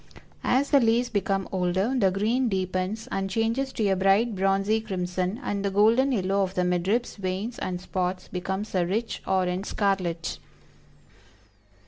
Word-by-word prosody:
As 270 +3 +2
the 280 - +7
leaves 235 +1 +2
become 195 -3 -1
older, 190 +5 0
the 200 -7 +3
green 225 +7 +1
deepens 185 +2 -2
and 195 0 -1
changes 230 +6 0
to 215 - 0
a 190 - +3
bright 195 +5 +3
bronzy 195 +3 +1
crimson, 185 +1 -2
and 200 -1 -2
the 200 - +1
golden 225 +7 +4
yellow 195 -3 +1
of 190 0 -1
the 180 - +1
mid 180 0 0
ribs, 235 +4 0
veins 195 +5 -3
and 180 -1 -3
spots 185 0 -3
becomes 190 +3 -4
a 185 -2 +2
rich 225 +5 -2
orange 185 +1 0
scarlet." 185 -5 -1
195 Hz, 155 wpm, -26 LUFS, 185-225 Hz, -, the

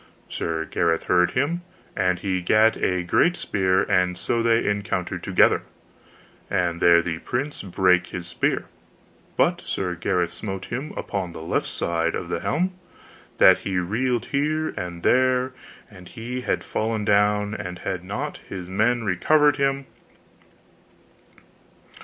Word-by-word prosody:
Sir 80 -1 -2
Gareth 85 0 0
heard 90 -1 +2
him, 150 +7 0 0.3
and 90 0 +1
he 95 0 -2
gat 110 +5 +4
a 90 -1 0
great 175 - +2
spear, 95 -1 +1
and 90 -1 +1
so 115 - -1
they 115 0 +2
encountered 95 -3 -2
together, 95 0 +3 0.9
and 85 -1 0
there 85 -1 +6
the 85 -2 -3
prince 135 - -3
brake 90 -1 +2
his 90 0 -6
spear; 90 - -1 0.7
but - - +2
Sir 90 -2 -3
Gareth 90 0 -1
smote 95 -2 -5
him 135 +6 -4
upon 95 -4 -3
the 80 - -8
left 80 - -1
side 85 0 -1
of - - -5
the - - -1
helm, 185 +4 0 0.6
that - - +7
he 95 -2 -3
reeled 115 +7 0
here 155 +3 0
and 85 -1 -6
there, 130 0 +3 0.4
and 90 -4 -14
he 125 +2 -5
had - - -1
fallen 110 -1 -2
down 105 0 +2 0.3
had 90 -1 -3
not 95 - -4
his 90 -2 -6
men 110 +5 +1
recovered 145 - +3
him. 140 -1 0
95 Hz, 140 wpm, -24 LUFS, 90-120 Hz, 0.9 s, that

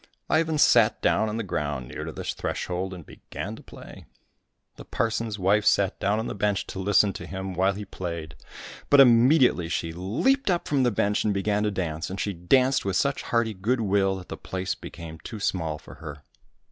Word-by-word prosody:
Ivan 160 0 +2
sat 115 -6 +5
down 110 - +2
on 105 - -3
the 115 - -2
ground 75 - -3
near - - -6
to - - -5
the - - -7
threshold 90 +1 -3
and 90 -4 -9
began - - -7
to - - -13
play. - - -13 0.7
The - - -10
parson's 110 -1 -2
wife 100 +2 +2
sat 100 -1 +2
down 100 +2 +1
on 110 - -2
the - - -4
bench 100 -1 0
to - - -6
listen 100 +1 +3
to - - -8
him 95 0 -5
while 95 +2 +2
he 105 +2 -7
played; 85 -5 -6 0.6
but 145 - +6
immediately 125 - +5
she 85 -1 -2
leaped 120 - 0
up 175 -2 0
from 140 -2 +1
the 125 - +3
bench 105 -1 0
and 105 -2 0
began 105 +1 0
to 105 - +1
dance, 85 -5 -3
and 95 +1 -6
she 100 - -1
danced 130 +10 +2
with 95 -2 -2
such 140 +5 +1
hearty 115 -2 0
good 115 +6 -1
will 100 -2 +2
that 95 -1 -10
the - - -6
place 95 0 -3
became 80 -1 -10
too 110 - -8
small 80 -6 -1
for - - -13
her. 75 -2 -10
100 Hz, 205 wpm, -26 LUFS, 90-115 Hz, 0.7 s, but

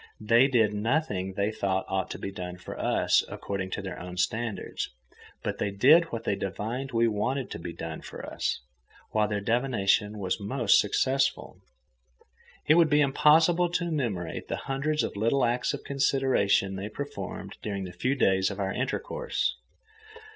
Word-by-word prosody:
They 115 +5 +5
did 115 -6 +3
nothing 105 - -1
they 100 +1 +1
thought 100 -3 -1
ought 95 -1 -1
to - - -5
be 100 - -5
done 90 -1 -6
for 90 - -8
us, - - +2
according 95 -2 -4
to 100 - -5
their 95 -2 -6 0.2
standards, 110 +3 -2 0.5
but - - -3
they 100 - 0
did 140 +12 +6
what 115 -8 -6
they 100 - 0
divined 115 +8 -4
we 115 0 +3
wanted 120 +5 -1
to - - -5
be 85 0 -6
done 80 -1 -6
for - - -8
us, - - -2 0.5
while 105 -1 +2
their 105 -1 -1
divination 110 -3 +1
was 95 -1 -2
most 105 +1 +3
successful. 135 +6 0 1.0
It 150 - +6
would 165 -2 +5
be 150 0 +4
impossible 160 +5 +4
to 175 -1 0
enumerate 115 - -3
the - - -2
hundreds 145 +3 0
of - - -3
little 115 +6 +2
acts 120 +1 0
of - - -6
consideration 130 -8 +1
they 100 +2 -4
performed 140 +6 -6
during 100 -2 -3
the 90 -1 -7
few 125 +10 0
days 95 -6 +3
of 100 0 -6
our 95 -1 -1
intercourse. 135 - -2
110 Hz, 165 wpm, -28 LUFS, 100-135 Hz, 1.0 s, did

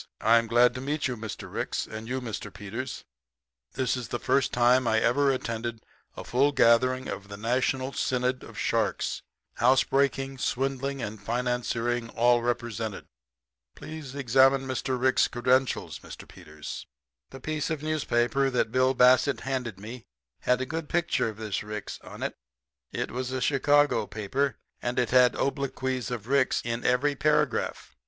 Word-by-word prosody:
I'm 115 +1 +4
glad 120 +2 +4
to 130 - -6
meet 145 +3 -1
you, 130 - -3
Mr. 110 -2 -7
Ricks - - -2
you - - -14
and 110 +1 -6
Mr. 125 -3 -4
Peters. 110 +5 -6 0.7
This 130 -2 0
is 125 -2 -5
the - - -2
first 135 +2 +1
time 120 +1 +4
I 110 -1 +3
ever 140 +5 +3
attended 115 -3 -3 0.3
a - - -6
full 140 +4 +2
gathering 130 0 +4
of 100 +1 -6
the 100 0 -8
National 130 +4 0
Synod 125 0 0
of - - -12
Sharks - - 0 0.4
housebreaking, 135 +1 +2
swindling, 135 +1 -1
and 105 0 -6
financiering 120 0 -1
all 120 +1 +4
represented. 120 -3 -3 0.7
Please 155 -4 -8
examine 135 0 +4
Mr. 130 0 -2
Rick's 130 +1 +3
credentials, 130 +2 0
Mr. - - -11
Peters.' - - -9 0.4
"The 135 - -10
piece 155 +3 -2
of 155 -2 -3
newspaper 135 -3 +1
that 125 -4 0
Bill 130 +1 +3
Bassett 125 +3 +4
handed 125 -7 -3
me 115 +4 -9 0.3
had 125 0 +1
a - - -1
good 160 +1 -5
picture 170 -9 +1
of 105 - -9
this 110 -3 -3
Ricks 105 0 -6
on - - -8
it. - - -2 0.6
It - - -3
was 130 +1 -3
a 130 - -2
Chicago 145 -2 +3
paper, 130 +7 -1 0.3
and 120 +1 -2
it 125 - +1
had 125 -1 +5
obloquies 130 -2 -2
of 120 -3 -5
Ricks 135 0 +2
in 115 0 -2
every 125 +4 +2
paragraph. 150 - 0
125 Hz, 155 wpm, -27 LUFS, 120-135 Hz, 0.7 s, had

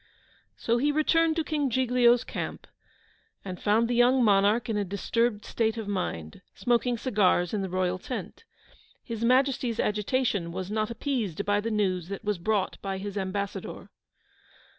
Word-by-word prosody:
So 235 +1 +1
he 290 +4 +2
returned 320 +2 +2
to 325 - 0
King 295 -3 -1
Giglio's 245 -1 +3
camp, - - -5 0.8
and 185 -2 -6
found 220 +3 +3
the 245 - -1
young 245 +2 +4
monarch 205 +2 +3
in 225 - -1
a 205 - +1
disturbed 210 +3 -1
state 225 0 0
of 220 -2 -5
mind, 175 - -4
smoking 240 0 +1
cigars 200 -7 +2
in 210 - 0
the 190 - -3
royal 185 0 -1
tent. 225 - -6 0.6
His 230 -2 -5
Majesty's 255 -1 +2
agitation 210 -4 0
was 185 +3 -5
not 215 0 0
appeased 230 - -2
by 205 0 +2
the 225 - -2
news 185 -5 0
that 200 +2 -6
was 210 -3 -1
brought 200 +1 -1
by 195 -1 -3
his 200 +1 -6
ambassador. 200 0 -4
215 Hz, 160 wpm, -27 LUFS, 195-245 Hz, 0.8 s, young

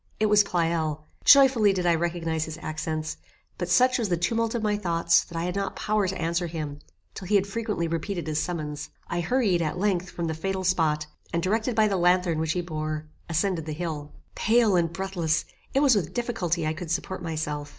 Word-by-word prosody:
It 215 - +3
was 210 0 +7
Pleyel. 165 -4 -1 0.2
Joyfully 260 -7 +7
did 180 -2 -2
I 170 - +4
recognize 165 -1 -1
his 160 0 -7
accents; 155 0 -3 0.4
but 175 -1 -2
such 250 +7 +4
was 220 -4 -1
the 175 - +1
tumult 225 +7 0
of 230 - -2
my 210 -1 +2
thoughts 170 -4 +2
that 170 - -8
I 165 - -1
had 180 +1 -2
not 200 0 -2
power 210 -2 0
to 190 - -3
answer 170 +1 0
him 155 -3 -5 0.3
till 185 - -8
he 210 - +2
had 195 -1 +4
frequently 210 -4 -2
repeated 165 +1 -3
his 155 -1 -1
summons. 150 -4 -4 0.2
I 175 - -1
hurried, 195 -2 +2
at 155 0 -2
length, 185 -2 0
from 170 - -4
the 160 - -1
fatal 190 +4 -3
spot, 160 -5 +1 0.3
and, 170 0 -1
directed 220 +5 0
by 220 -1 +4
the 195 -2 0
lanthorn 180 -2 +3
which 160 0 0
he 180 - -1
bore, 155 -2 -4 0.2
ascended 165 0 0
the 155 - -3
hill. 150 -2 -4 0.2
Pale 225 -2 +3
and 170 -2 +2
breathless, 170 -3 -1 0.3
it 275 - +4
was 275 -5 +5
with 180 -7 -2
difficulty 190 -9 -1
I 155 - 0
could 165 +1 -7
support 180 +2 -2
myself. 150 -3 -3
175 Hz, 210 wpm, -26 LUFS, 160-200 Hz, 0.4 s, was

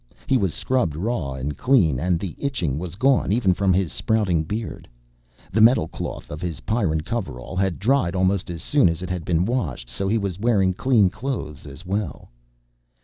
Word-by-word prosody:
He - - +2
was 95 -9 +1
scrubbed 110 - 0
raw 85 - -2
and 65 +3 -4
clean 95 - +3
and 85 +2 +1
the 90 -2 -5
itching 90 - -1
was 90 0 -6
gone 130 -2 +2
even 105 -4 +3
from 95 +1 +1
his 95 -2 +1
sprouting 105 -8 +1
beard. 105 +7 -5 0.6
The 110 - +2
metalcloth 110 -8 +2
of 75 - -6
his 85 -3 -4
Pyrran 100 -9 0
coverall 95 - -5
had 95 -2 0
dried 100 -5 +1
almost 95 0 +1
as 85 -1 -5
soon 145 - +4
as 85 +2 -3
it 90 - -4
had 90 -2 -3
been 85 +1 +1
washed 115 - -2
so 95 +11 -2
he 110 +3 +2
was 100 -4 -3
wearing 100 -5 +2
clean 105 -3 +3
clothes 85 - -5
as 70 +5 -11
well. 95 - -4
95 Hz, 185 wpm, -23 LUFS, 80-110 Hz, 0.6 s, soon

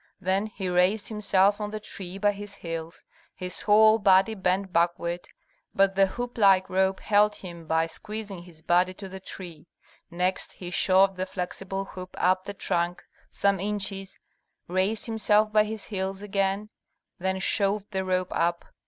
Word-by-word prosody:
Then 195 +2 0
he 200 -3 -5
raised 180 +4 +2
himself 205 -1 +3
on 210 - -2
the 215 0 -5
tree 190 -3 -8
by 205 +1 +3
his 205 0 -8
heels, 165 -2 -7 0.3
his 180 0 -5
whole 215 +1 +6
body 195 +1 +4
bent 190 -1 -1
backward, 170 +1 0 0.5
but 195 0 +4
the 195 0 +4
hoop 245 +4 -6
like 195 -2 +5
rope 190 +1 +1
held 210 0 +3
him 170 -4 -10
by 160 0 +2
squeezing 205 +2 -6
his 170 -2 -15
body 180 +1 +2
to 195 - -8
the 190 0 -8
tree. 175 -4 -9 0.4
Next 180 +2 -2
he 180 -1 -8
shoved 190 +1 +4
the 185 +1 -2
flexible 195 +1 -4
hoop 185 -1 -10
up 185 +1 +2
the 200 - -6
trunk 175 -1 -1 0.3
some 200 -1 +1
inches, 195 -1 -3 0.5
raised 190 +5 0
himself 215 -1 +2
by 215 0 +5
his 215 -1 -6
heels 195 -1 -4
again, 195 +1 -1 0.5
then 190 +1 -1
shoved 200 +2 0
the 190 -1 -1
rope 185 -1 -1
up. 170 +1 0
190 Hz, 160 wpm, -26 LUFS, 180-205 Hz, 0.5 s, whole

